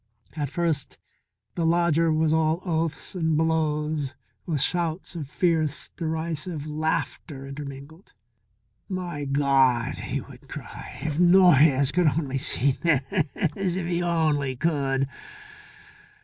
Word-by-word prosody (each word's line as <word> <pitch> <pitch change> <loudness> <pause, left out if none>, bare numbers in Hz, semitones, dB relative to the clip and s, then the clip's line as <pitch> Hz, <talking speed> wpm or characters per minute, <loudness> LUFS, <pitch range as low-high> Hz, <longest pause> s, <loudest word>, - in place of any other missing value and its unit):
At 145 -3 -2
first 160 -3 -1 0.6
the 170 - -2
lodger 165 -1 +3
was 155 0 +2
all 160 +2 +1
oaths 165 -2 -1
and 160 -4 0
blows 155 -3 0 0.3
with 155 -4 0
shouts 170 +4 -1
of 150 -5 -5
fierce, 160 -2 0
derisive 160 -1 -3
laughter 155 -2 -3
intermingled. 140 +4 -9 0.8
"My 175 -6 -4
God!" 135 -4 +2
he - - -3
would - - -13
cry. - - -8
"If 155 0 -2
Noyes 160 -7 +6
could 180 0 +2
only 140 -3 0
see 135 +1 +2
this 170 +3 0
if 185 -2 -2
he 175 0 -1
only 155 -6 +1
could!" 135 -3 0
155 Hz, 115 wpm, -25 LUFS, 140-170 Hz, 0.8 s, Noyes